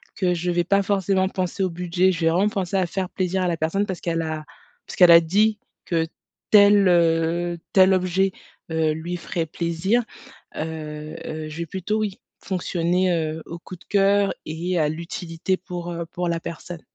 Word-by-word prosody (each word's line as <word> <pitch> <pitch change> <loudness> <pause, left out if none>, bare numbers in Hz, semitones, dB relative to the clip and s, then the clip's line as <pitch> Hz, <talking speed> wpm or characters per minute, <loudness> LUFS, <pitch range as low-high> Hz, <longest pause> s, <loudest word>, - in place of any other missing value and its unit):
que 180 -2 +1
je 175 +1 -1
vais 175 0 +1
pas 200 +3 +2
forcément 195 -1 +1
penser 185 0 -2
au 185 - +1
budget. 180 +2 +1
Je 170 - -4
vais - - +5
vraiment 185 +5 +3
penser 195 -2 -3
à 185 - +2
faire 185 +1 -3
plaisir 185 0 -1
à 180 - +1
la 170 -2 0
personne 165 +6 0
parce 185 -3 -5
qu'elle 165 -1 -1
a 155 -1 -4 0.4
parce - - -8
qu'elle 180 -2 +7
a 170 0 +9
dit 210 +6 +2 0.3
que 165 -2 0 0.5
tel, 205 -1 +7
heu, 170 0 +2 0.2
tel 190 0 +6
objet, 185 +1 +1 0.4
heu, 160 -1 +1
lui 170 +3 -4
ferait 170 -1 -3
plaisir. 170 +8 0 0.5
Heu 155 -1 -5
heu, 155 0 -5
je 150 - -8
vais 170 - -3
plutôt, 190 +6 -2
oui, 210 -1 -2 0.2
fonctionner, 180 0 0
heu, 160 -1 -2
au 170 - -7
coup 180 +2 -10
de - - -21
cœur 200 0 +3
et 170 +3 -2
à 155 -2 +2
l'utilité 165 +3 -3
pour, 175 -1 -6
heu, 170 0 -4
pour 175 +1 -3
la 165 0 -1
personne. 170 +1 -7
175 Hz, 190 wpm, -23 LUFS, 165-190 Hz, 0.5 s, a